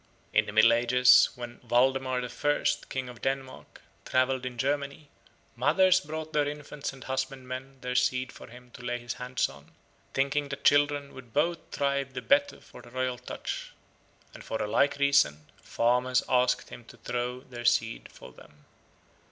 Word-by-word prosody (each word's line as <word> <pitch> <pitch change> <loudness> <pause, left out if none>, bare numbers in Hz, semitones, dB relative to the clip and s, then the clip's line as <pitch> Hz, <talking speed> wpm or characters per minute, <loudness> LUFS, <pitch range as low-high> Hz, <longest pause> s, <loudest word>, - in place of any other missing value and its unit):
In - - +3
the - - -4
Middle - - +6
Ages, 125 +2 +6
when 120 -1 -8
Waldemar 130 0 +1
I., 145 +4 -1 0.2
King 130 -1 -3
of 125 -2 -11
Denmark, 135 -1 -4 0.2
travelled 130 0 +1
in 125 -1 -7
Germany, 140 +2 -2 0.5
mothers 185 -1 +4
brought 155 -2 -7
their 150 -1 +2
infants 150 0 -5
and 135 -2 -12
husbandmen 130 0 -5
their 125 0 -3
seed 130 0 +1
for - - -12
him 125 +1 -15
to - - -12
lay 120 0 -2
his 120 -1 -5
hands 125 0 0
on, 70 +2 -15 0.4
thinking 140 +1 0
that 140 0 -6
children 145 -1 +3
would 125 -3 -13
both 165 +4 +1
thrive 140 -1 -1
the - - -3
better 285 0 +2
for 125 - -14
the 120 - -15
royal 130 0 -2
touch, 125 - -6 0.6
and - - -11
for 110 - -4
a - - -1
like 140 +7 +2
reason 140 - +3 0.2
farmers 125 +2 +1
asked 125 0 +2
him - - -10
to - - -15
throw 125 +1 -3
the 120 -2 -9
seed 115 -1 +1
for - - -13
them. 75 0 -19
130 Hz, 170 wpm, -28 LUFS, 125-140 Hz, 0.6 s, Middle